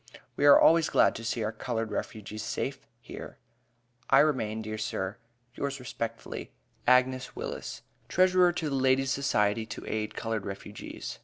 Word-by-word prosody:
We 145 - +3
are 145 - +9
always 165 0 +5
glad - - +4
to 115 - -7
see 115 0 -1
our 110 - -1
colored 115 -1 -3
refugees 105 0 -5
safe 130 +5 -4
here. - - -9 0.7
I 135 - +6
remain, 110 -8 0
dear 110 0 -5
sir, 100 -1 -3 0.3
yours 140 +1 -3
respectfully, 115 -2 -5 0.4
AGNES 130 0 +3
WILLIS, - - -6 0.3
Treasurer 185 -1 +5
to 160 -3 -2
the - - 0
Ladies' 135 0 +2
Society 110 -6 +1
to 110 - -7
aid 110 0 -3
colored 110 -3 -2
refugees. 100 +1 -7
115 Hz, 150 wpm, -29 LUFS, 110-135 Hz, 0.7 s, are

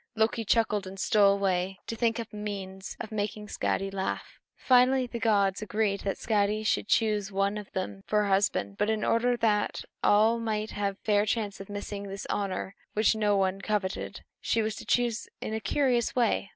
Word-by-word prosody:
Loki 225 +1 +1
chuckled 210 -3 +1
and 190 +1 -9
stole 200 -1 +4
away 190 -1 0
to 230 - -4
think 230 0 +1
up 230 -1 -6
a - - -7
means 195 -2 -6
of 220 - -6
making 210 0 -3
Skadi 195 -1 -1
laugh. 190 -1 -4 0.2
Finally, 255 +1 +4
the 240 -1 -6
gods 200 -4 +2
agreed 210 -1 0
that 195 - -2
Skadi 210 0 +1
should 210 - +1
choose 210 -3 +1
one 195 +1 +1
of 210 -2 -7
them 190 +1 -4
for 210 0 +2
her 205 - -1
husband; 190 - +1
but 210 - +2
in 220 -1 0
order 240 +1 +2
that 210 -3 +1 0.2
all 220 +3 +4
might 215 -1 -2
have 200 -1 -2
a - - -42
fair 210 0 +3
chance 205 -2 -1
of 195 - -10
missing 205 0 -5
this 195 0 -6
honor 195 -1 -2 0.2
which 215 +1 +3
no 210 -2 +2
one 195 0 0
coveted, 205 -2 -2 0.2
she 225 - +1
was 215 0 -2
to - - -9
choose 240 -2 +1
in 220 - -4
a 220 - -1
curious 245 0 +1
way. 230 -5 +1
210 Hz, 195 wpm, -28 LUFS, 195-220 Hz, 0.2 s, stole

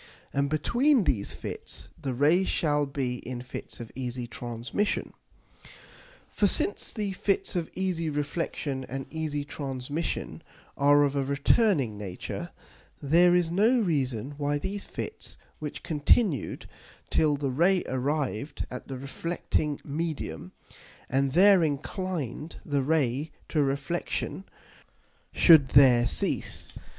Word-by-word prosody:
and 140 0 +1
between 240 - +3
these 105 - 0
Fits - - -5
the 135 -6 -4
Rays 160 +8 +3
shall 145 -2 +1
be 130 -3 -2
in 125 0 -6
Fits 125 +1 -8
of 115 -2 -8
easy 125 -1 -4
Transmission._ 120 - -3 1.2
For 205 - +2
since 200 - +1
the 210 -3 -2
Fits 195 +1 0
of 170 -3 -1
easy 180 -4 -1
Reflexion 145 -2 -2
and 135 0 -4
easy 155 -2 -2
Transmission 145 +2 -4 0.3
are 145 +1 +5
of 140 -1 0
a 140 - +1
returning 140 - +2
nature, 95 -3 -5 0.5
there 175 +5 +5
is 175 -2 +2
no 220 +8 +4
reason 135 - -1
why 145 0 0
these 200 +7 -4
Fits, 440 - -6 0.2
which 150 -2 -6
continued 155 - +1 0.5
till 150 -2 +3
the 140 -2 -1
Ray 175 +7 +3
arrived 140 0 -2
at 125 - -7
the 135 - -5
reflecting 150 +1 -2
Medium, 145 - -4 0.6
and 135 0 +1
there 190 +2 +7
inclined 155 - -3
the 145 -2 0
Ray 145 0 +1 0.2
to 155 - +2
Reflexion, 140 +7 -2 0.9
should 155 -6 +7
there 125 -4 +6
cease. - - -2
145 Hz, 120 wpm, -28 LUFS, 135-170 Hz, 1.2 s, there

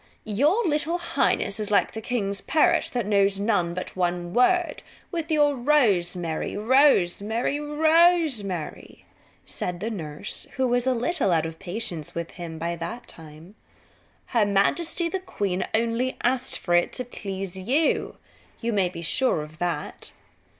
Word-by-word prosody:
"Your 295 - +2
little 315 +1 +1
highness 225 - 0
is 210 - -2
like 205 - +2
the 220 - -5
king's 200 -4 -2
parrot 340 +1 +2
that 240 -4 -1
knows 200 -1 +2
but 185 -4 -1
one 175 -1 -1
word 350 - +2 0.3
with 335 -3 -3
your 295 -2 +3
rosemary, 195 - +1
rosemary, 230 0 +2
rosemary," 300 - +1 0.4
said 180 -1 -4
the 220 +5 -3
nurse 155 -8 -5
who 260 -1 +1
was 245 +1 +1
a 260 - +3
little 250 - 0
out 160 -2 +2
of 160 0 -7
patience 180 -5 -4
by 170 0 -5
that 230 +9 -6
time. 160 +3 -11 0.7
"Her 230 -4 +2
majesty, 260 - +2
the 380 +3 -2
queen, 195 - -2
only 235 +3 0
asked 255 +1 +1
for 175 - -2
it 175 0 +3
to 250 - -3
please 195 -5 -6
you. 260 - 0 0.4
You 230 0 -2
may 190 -3 +2
be 170 -1 -8
sure 170 - +2
of 155 +2 -13
that." 170 -4 -3
210 Hz, 140 wpm, -25 LUFS, 175-275 Hz, 0.7 s, your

